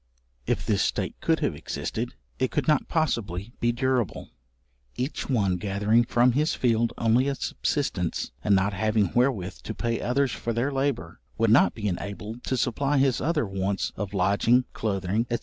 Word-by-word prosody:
If - - 0
this - - +1
state - - -1
could - - +1
have - - +1
existed, 120 +2 -4 0.2
it 130 - +1
could - - -1
not 155 -1 +3
possibly 115 - -1
be 120 - +2
durable; 125 - -1 0.6
each 135 +4 -3
one 100 -8 +2
gathering 105 +5 +2
from 120 +1 +3
his 150 +6 +1
field 115 -2 +2
only 115 +4 +3
a 140 - 0
subsistence, 105 - -2
and 100 - +4
not 95 +2 +1
having 105 0 +1
wherewith 120 -7 +1
to 110 - -6
pay 115 -1 -1
others 130 +1 +1
for 115 - -3
their 120 +5 0
labour, 135 - -2 0.2
would 115 -1 +3
not 115 - +5
be 105 -2 -3
enabled 105 +5 -5
to 130 - 0
supply 140 +4 +1
his 135 -2 +2
other 150 -2 +1
wants 95 0 -2
of 100 0 -4
lodging, 100 +7 +3
cloathing, 105 +2 -1
&c. 120 - +1
115 Hz, 170 wpm, -26 LUFS, 100-130 Hz, 0.6 s, not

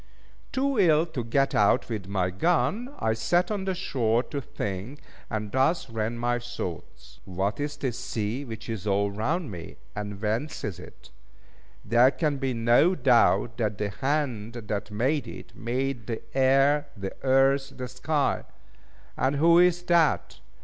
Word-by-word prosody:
Too 270 -2 0
ill 160 -4 +5
to 140 -7 -5
get 135 +4 +1
out 105 -1 +3
with 105 -5 -5
my 95 -2 0
gun, 180 - +1
I 110 - +1
sat 175 - +1
on 200 -2 -2
the 190 -1 -1
shore 120 -10 0
to 140 - -1
think, 105 +4 -5 0.3
and 105 -2 -3
thus 135 +1 +1
ran 115 +1 -2
my 120 +1 0
thoughts: 120 -8 -7
"What 95 +5 -2
is 145 0 -3
this 130 -5 -3
sea 110 +5 -3
which 115 -5 -8
is 110 -4 -5
all 100 0 +1
round 140 - -2
me? 85 -3 -9 0.2
and 105 -1 -5
whence 110 +8 -2
is 100 -5 -4
it? - - -14 0.7
There 120 +4 +5
can 145 +2 -1
be 135 -1 -1
no 120 +10 +4
doubt 120 -4 +3
that 105 -4 -1
the 105 -1 -2
hand 125 -2 -2
that 105 -3 -4
made 125 +5 0
it, - - -10
made 125 -1 -3
the 115 -2 -4
air, 135 +2 +4
the 95 -1 -5
earth, 135 +1 +3
the 125 -1 -4
sky. 140 +4 -1 0.7
And 135 +2 +1
who 170 +4 +5
is 175 0 +4
that? 170 -3 +2
125 Hz, 160 wpm, -27 LUFS, 110-145 Hz, 0.7 s, ill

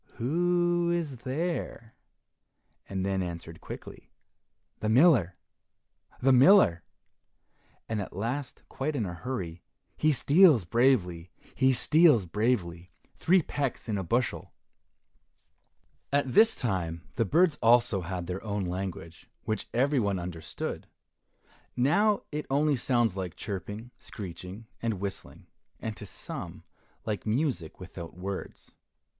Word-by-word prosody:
Who 175 +5 +1
is 165 -6 -1
there?" 130 -3 -4 1.0
and 95 -1 -2
then 95 -1 0
answered 85 -2 -6
quickly, - - -10 0.7
"The 110 - -1
miller! 115 - +4 0.8
the 135 +2 +3
miller!" 130 - +6 1.0
and 110 -2 -2
at 95 - -6
last 120 +8 -4
quite 145 +3 -3
in 115 -6 -1
a 90 - -5
hurry, 90 -4 -5 0.3
"He 155 - +2
steals 150 - +5
bravely! 90 -6 +2 0.2
he 130 0 +3
steals 145 - +4
bravely! 90 -3 -1 0.2
three 180 0 +3
pecks 140 -4 -3
in 110 - -1
a 95 - -2
bushel." 120 +7 -1 1.6
At 140 -3 +1
this 225 - +6
time 85 -7 -2
the 115 - +1
birds 160 - +2
also 115 -4 +4
had 90 0 -4
their 90 +2 -5
own 105 -3 -2
language 90 -2 -6
which 110 -1 -3
every 135 +3 +2
one 100 -4 0
understood; 85 -3 -5 0.9
now 200 - +3
it 150 0 -4
only 145 +2 +2
sounds 120 -5 +1
like 90 -4 -4
chirping, 105 +4 -6
screeching, 95 -2 -9 0.2
and 115 -2 -1
whistling, 100 +1 -7 0.3
and 110 -1 -4
to 105 - -10
some - - -8 0.4
like 105 0 -3
music 110 - -1
without 85 0 -9
words. 95 +1 -6
115 Hz, 120 wpm, -28 LUFS, 95-140 Hz, 1.6 s, miller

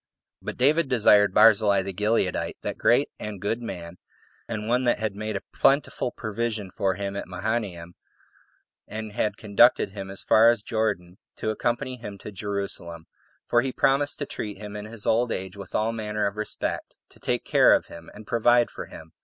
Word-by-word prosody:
4. - - -22
But - - -4
David 145 +3 +3
desired 105 -5 +5
Barzillai 100 -1 +5
the 95 0 -5
Gileadite, 105 -1 0
that - - -4
great - - +3
and 105 -2 -6
good 110 +5 -2
man, 90 -6 -7 0.5
and 110 -2 -4
one 125 +2 +2
that 120 - +3
had 110 -2 -3
made 110 0 -3
a - - -8
plentiful 135 -2 +2
provision 110 -3 -3
for 95 -1 0
him 100 0 -4
at 100 - -5
Mahanaim, 90 -3 -3 0.9
and 110 +1 -6
had 105 +1 -1
conducted 100 -2 +4
him 95 -1 -7
as 95 - -5
far 115 +2 +6
as 120 -3 +1
Jordan, 105 -6 -2 0.2
to 110 - -2
accompany 125 +4 -2
him 105 -4 -8
to 105 - -9
Jerusalem, 100 -5 -4 0.4
for 120 - +4
he 130 +1 -2
promised 140 +3 +1
to 145 - -3
treat 105 -6 -6
him 105 0 -8
in 105 0 -6
his 110 -1 -5
old 115 +1 +2
age 95 -1 -4
with 100 -2 -9
all 110 +1 +1
manner 105 -2 -2
of 100 - -2
respectto 110 0 -5
take - - -1
care - - +6
of - - -1
him, 85 -1 -12
and 105 +1 -12
provide 120 +1 +3
for - - -7
him. 80 0 -12
105 Hz, 185 wpm, -25 LUFS, 100-115 Hz, 0.9 s, far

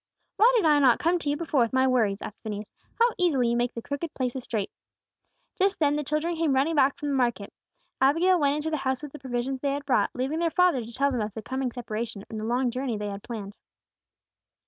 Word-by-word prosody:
"Why 460 +3 +6
did 435 -7 +3
I 300 -2 +5
not 260 -4 +5
come 345 +2 +1
to 295 - -3
you 290 - 0
before 320 -3 0
with 235 0 +2
my 260 0 +4
worries?" 220 -6 +1
asked 210 - -8
Phineas. 210 -1 -6 0.2
"How 470 +1 +3
easily 280 -10 +2
you 235 - +1
make 240 0 -1
the 230 - -5
crooked 285 +3 -5
places 255 0 -2
straight!" 215 -5 -3 0.9
Just 390 +1 +2
then 295 -2 +2
the 300 - -1
children 305 +4 -1
came 315 -4 +1
running 280 +5 +2
back 280 -2 +3
from 295 -4 -4
the - - 0
market. 240 -6 0 0.5
Abigail 335 +7 +4
went 285 -1 +2
into 305 +1 -2
the 310 - 0
house 265 0 -2
with 295 - -7
the 300 - -10
provisions 260 0 -3
they 280 -1 0
had 285 0 -4
brought, 270 - +2
leaving 270 +6 -2
their 335 -1 +2
father 355 -7 +3
to 225 - -10
tell 275 +4 +1
them 245 -4 -1
of 210 -1 -4
the 220 - -6
coming 260 +1 -2
separation 220 -3 -5
and 220 - -4
the 215 - -4
long 245 +2 +1
journey 250 -2 -2
they 205 0 -4
had 200 0 -6
planned. 205 -4 -7
265 Hz, 240 wpm, -26 LUFS, 235-300 Hz, 0.9 s, Why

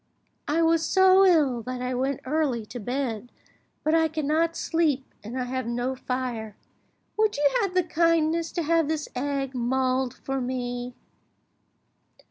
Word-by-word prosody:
I 325 +3 +2
was 325 0 +3
so 380 +3 +5
ill 295 -10 +3
that 255 +2 -5
I 250 +1 -2
went 265 +2 -1
early 265 -5 0
to 245 - -8
bed, 245 -1 -3 0.5
but 310 - +1
I 325 0 +4
cannot 315 +2 0
sleep, 310 -7 0 0.2
and 235 +5 -5
I - - 0
have 255 -1 -3
no 245 +2 -1
fire. 250 -5 -4 0.6
Would 430 -4 +2
you 290 0 +4
have 390 -3 -2
the 365 - +4
kindness 330 -1 +1
to 340 - -1
have 330 0 +2
this 310 -1 -2
egg 275 0 -2
mulled 255 +1 0
for 270 0 -4
me?" 245 -1 -4
270 Hz, 150 wpm, -26 LUFS, 250-325 Hz, 0.6 s, so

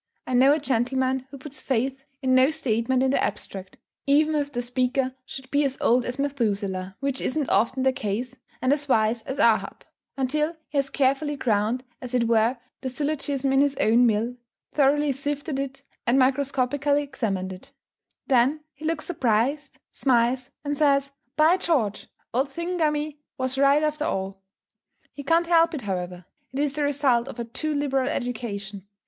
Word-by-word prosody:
I 255 - -4
know 260 +3 +6
a 295 - +4
gentleman 260 -1 0
who 275 - -9
puts 280 +2 -8
faith 265 +1 -1 0.2
in 260 0 +2
no 260 +2 +6
statement 255 -4 0
in 265 - +2
the - - +1
abstract, 190 -1 -4 0.3
even 305 +3 +4
if 290 -1 -1
the 245 -2 -3
speaker 255 +1 0
should 265 -1 -9
be 285 +1 +3
as 270 -1 -1
old 245 +1 +3
as 250 +1 -4
Methuselah 200 -9 -2
which 275 -1 -2
isn't 290 0 -1
often 255 +3 +2
the 265 0 +3
case 245 -1 -3 0.3
and 255 +2 +4
as 290 -1 -3
wise 225 -1 +2
as 265 - -4
Ahab, 230 -4 +2 0.3
until 300 +5 0
he 285 - 0
has 275 0 -1
carefully 280 +2 +1
ground, 230 -1 0 0.2
as 250 0 -4
it 245 - +3
were, 230 +2 +3 0.2
the 260 - -3
syllogism 280 -1 -1
in 270 - +5
his 285 -1 +2
own 240 0 +4
mill, 230 +3 0 0.4
thoroughly 290 +1 +3
sifted 285 +1 -3
it, 275 0 -5 0.2
and 240 +3 +4
microscopically 275 +2 +2
examined 200 -9 -3
it; 270 +10 -13 0.5
then 270 +3 +3
he 305 +2 -10
looks 320 -1 -1
surprised, 270 -1 0
smiles, 250 0 +1
and 290 0 -1
says, 280 -1 +2 0.2
"By 315 +4 +5
George, 275 - 0 0.3
old 265 +4 +1
Thingummy 305 -2 -1 0.2
was 260 0 -1
right 280 +2 +5
after 305 0 0
all." 195 -5 -3 0.7
He 285 - -7
can't 330 +5 +2
help 335 -1 +4
it 280 - -4
however; 180 -2 -4 0.3
it 265 - -6
is 285 -1 +1
the 300 - -2
result 280 -4 +2
of - - -8
a 235 - -2
too 300 +6 -3
liberal 270 -2 0
education. 210 - -4
265 Hz, 170 wpm, -25 LUFS, 240-285 Hz, 0.7 s, know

